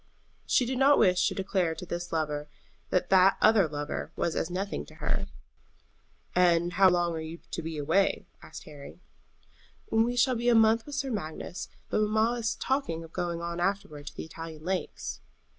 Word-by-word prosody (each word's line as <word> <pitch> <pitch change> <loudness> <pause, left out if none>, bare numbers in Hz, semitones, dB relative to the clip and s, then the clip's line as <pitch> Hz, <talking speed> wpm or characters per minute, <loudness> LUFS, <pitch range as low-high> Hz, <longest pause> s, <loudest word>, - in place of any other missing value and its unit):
She 250 - +3
did 255 +1 -2
not 280 +2 +6
wish 180 -1 +4
to - - -2
declare 190 -4 0
to 180 - -7
this 175 0 -5
lover 150 -2 -2 0.4
that 180 0 0
that 190 0 +6
other 215 -5 +5
lover 145 -1 -4
was 170 - -1
as 160 - -1
nothing 195 +3 -3
to - - -15
her. - - -2 1.1
"And 175 -1 +3
how 190 +1 +6
long 175 -1 +1
are 160 - -4
you 160 +1 -7
to - - -3
be 160 -1 -5
away?" 175 +7 +1 0.2
asked - - -10
Harry. 140 - -12 0.9
"We 225 +2 +2
shall 255 +1 +3
be 240 0 +1
a 240 - +5
month 225 +2 +4
with 290 - -6
Sir 275 -1 -2
Magnus; 180 -3 -5 0.2
but - - +2
mamma 220 +3 +2
is 225 -1 -1
talking 260 - -1
of 165 - -13
going 170 -1 -3
on 170 0 -4
afterward 180 -6 -2
to - - -7
the - - -6
Italian 160 -1 -9
lakes." 185 0 -3
180 Hz, 185 wpm, -28 LUFS, 165-220 Hz, 1.1 s, not